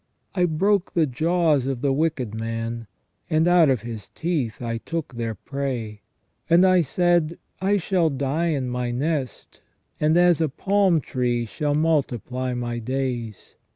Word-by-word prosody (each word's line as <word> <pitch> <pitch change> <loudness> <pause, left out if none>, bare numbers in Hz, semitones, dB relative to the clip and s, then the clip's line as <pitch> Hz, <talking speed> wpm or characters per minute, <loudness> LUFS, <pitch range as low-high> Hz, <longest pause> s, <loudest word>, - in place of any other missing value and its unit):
I 180 -2 +2
broke 190 +4 +1
the 165 -2 +4
jaws 155 0 +1
of 135 -3 -2
the 140 -1 +2
wicked 140 -7 -1
man; 115 0 -4 0.4
and 160 0 +2
out 175 -4 +5
of 130 -5 +1
his 115 -3 -7
teeth 150 -11 -2
I 115 -1 -3
took 165 +1 -5
the 115 -3 -4
prey. 125 -7 -4 0.5
And 170 +3 +6
I 185 -1 +5
said: 170 +1 +1 0.2
I 195 +2 +2
shall 180 -3 +1
die 140 +4 -1
in 140 -6 -1
my 125 0 -2
nest, 135 0 -3 0.4
and 155 +2 +3
as 175 -2 +4
a 160 - +2
palm 190 +2 +2
tree 120 -2 -1
shall 145 +6 -2
multiply 130 - 0
my 120 -1 -3
days. 120 -3 -4
140 Hz, 155 wpm, -24 LUFS, 120-165 Hz, 0.5 s, And